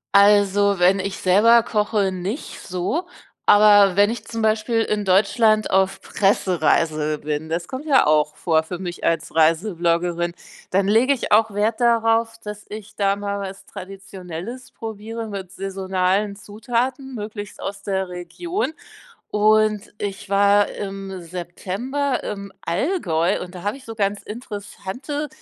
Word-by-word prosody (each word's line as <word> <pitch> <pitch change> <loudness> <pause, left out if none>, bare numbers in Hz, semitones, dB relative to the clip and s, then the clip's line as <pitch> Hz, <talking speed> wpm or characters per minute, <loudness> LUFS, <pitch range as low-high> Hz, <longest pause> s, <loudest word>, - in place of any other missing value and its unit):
Also, 200 0 +5
wenn 185 +2 +4
ich 195 0 -3
selber 225 +5 +5
koche, 210 -3 0
nicht 190 - -5
so, 185 - -2 0.4
aber 205 -2 +6
wenn 205 +1 +5
ich 235 - -5
zum 230 -1 -4
Beispiel 220 +1 +1
in 210 -2 -1
Deutschland 215 +3 +3
auf 190 0 +2
Pressereise 155 -5 +1
bin 150 +1 -3
das 170 +2 -3
kommt 265 +3 -6
ja 280 -4 +4
auch 150 0 +2
vor 160 -2 +1
für 175 +3 -6
mich 175 -1 -6
als 165 - 0
Reisebloggerin, 170 +1 +1 0.4
dann 195 +1 +1
lege 235 +6 +4
ich 250 - -5
auch 220 +1 +4
Wert 215 +2 0
darauf, 230 -1 +2
dass 210 0 -7
ich 210 -1 -9
da 200 -1 +2
mal 200 0 -3
was 195 -1 -7
Traditionelles 190 +4 -8
probiere 225 +1 -6
mit 195 -3 -6
saisonalen 195 +1 -1
Zutaten, 240 +6 -3
möglichst 210 -1 -7
aus 200 0 -5
der 190 -2 -2
Region, 315 - -4 0.6
und 215 0 +2
ich 200 0 -5
war 200 +1 +4
im 195 -1 -6
September 190 - -3
im 200 -1 -6
Allgäu 180 - 0
und 180 0 -8
da 175 - -9
habe 205 +5 -1
ich 270 - -15
so 225 -1 -8
ganz 200 -1 -1
interessante 235 +6 -6
200 Hz, 140 wpm, -22 LUFS, 185-220 Hz, 0.6 s, aber